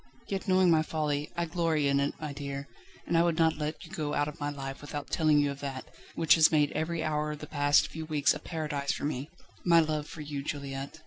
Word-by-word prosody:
Yet, 195 0 -3
knowing 185 -1 +5
my 160 -1 +5
folly, 150 -2 -1
I 170 - +1
glory 165 -3 +1
in 140 0 +3
it, 140 +1 0
my 150 -2 -4
dear, 140 0 -5 0.4
and 170 - -1
I 165 - +6
would 170 -1 +2
not 160 -2 +3
let 150 +1 -4
you - - -14
go 150 -2 -2
out 145 0 +1
of 150 - -7
my 145 0 -1
life 135 -1 -6
without 145 0 -6
telling 155 -3 +3
you 145 -1 +3
of 140 - -8
that, 135 -2 -5 0.3
which 165 -2 +5
has 160 -2 +6
made 150 -2 +3
every 160 +2 -2
hour 150 -1 0
of - - -7
the 150 - -8
past 145 -1 +3
few 160 0 -7
weeks 150 -3 +3
a - - -6
paradise 150 -4 -2
for - - -4
me 145 0 -3 0.3
my 170 -1 +6
love 155 -2 0
for 160 - -8
you, 145 -1 -4
Juliette." 140 0 -5
150 Hz, 245 wpm, -30 LUFS, 145-160 Hz, 0.4 s, I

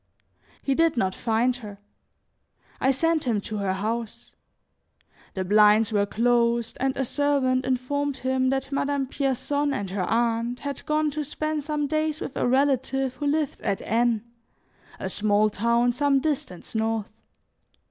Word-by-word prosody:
He 275 - +1
did 330 -1 +2
not 190 -4 +1
find 235 +3 +1
her; 210 -4 -9 1.0
I 265 - +2
sent 320 +3 +1
him 230 -4 +1
to 215 +1 -5
her 195 -2 0
house. 220 +3 -4 1.0
The 190 - -1
blinds 210 +2 +5
were 205 -1 +2
closed, 235 0 +1
and 265 0 0
a 270 - 0
servant 260 -2 +1
informed 270 +2 -1
him 260 0 0
that 270 +1 -2
Madame 280 0 0
Pierson 280 +2 -1
and 195 -2 -4
her 190 -2 -1
aunt 235 +1 0
had 280 -2 -5
gone 305 0 +1
to 300 +1 -3
spend 310 +1 -3
some 300 0 -1
days 310 +1 -1
with - - -6
a - - 0
relative 270 0 +1
who 290 - -2
lived 300 -1 -1
at 195 - -2
N, 230 -1 +1 0.8
a - - -3
small 210 +2 +2
town 235 +3 +2
some 280 +1 +2
distance 270 - -3
north. 220 -1 0
255 Hz, 150 wpm, -25 LUFS, 225-285 Hz, 1.0 s, blinds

